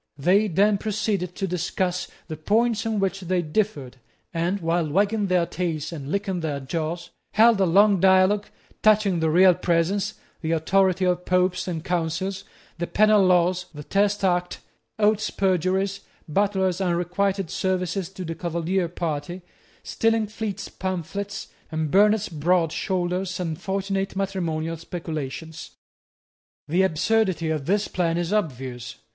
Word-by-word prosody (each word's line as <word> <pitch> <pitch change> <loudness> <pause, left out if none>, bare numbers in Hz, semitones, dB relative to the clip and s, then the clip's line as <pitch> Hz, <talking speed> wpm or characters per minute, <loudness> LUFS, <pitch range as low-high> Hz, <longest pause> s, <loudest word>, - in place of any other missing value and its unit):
They 190 +9 +3
then 200 +3 +3
proceeded 205 -4 -2
to 195 - -2
discuss 180 +1 -2 0.2
the 160 - -5
points 220 +7 +1
on 220 -2 0
which 195 0 0
they 180 -1 -1
differed, 150 -7 -2 0.4
and, 175 +4 0
while 165 -2 0
wagging 205 +5 +1
their 180 -2 +2
tails 160 -3 -3
and 145 -4 -7
licking 195 -2 -1
their 150 -4 -2
jaws, 165 +5 -4 0.2
held 220 -1 +5
a 190 - +4
long 200 +3 +5
dialogue 190 +2 +4 0.3
touching 210 -4 +4
the 160 0 +1
real 180 +3 +6
presence, 180 +4 0 0.3
the 160 -1 -1
authority 185 +3 +2
of 180 0 0
Popes 185 0 +1
and 165 -2 -4
Councils, 180 +3 -2 0.4
the 175 - -2
penal 215 -1 +4
laws, 180 0 +2
the 150 - -7
Test 200 +4 +1
Act, 180 -1 +1 0.4
Oates's 215 0 +2
perjuries, 190 +1 0 0.3
Butler's 190 +1 +1
unrequited 180 +1 0
services 185 -1 -1
to 190 -1 -7
the 165 - -3
Cavalier 170 +2 -1
party, 170 +1 -4 0.4
Stillingfleet's 220 -2 -1
pamphlets, 190 +2 -4 0.2
and 155 -2 -2
Burnet's 210 +1 +4
broad 165 +1 +1
shoulders 185 +1 -2
and 165 -3 -3
fortunate 195 0 -2
matrimonial 165 -5 -2
speculations. 160 -2 -6 0.9
The 175 +5 +2
absurdity 190 -1 +1
of 150 -3 -3
this 205 +3 +1
plan 170 -2 0
is 175 +3 -1
obvious. 130 - -3
185 Hz, 135 wpm, -24 LUFS, 165-195 Hz, 0.9 s, real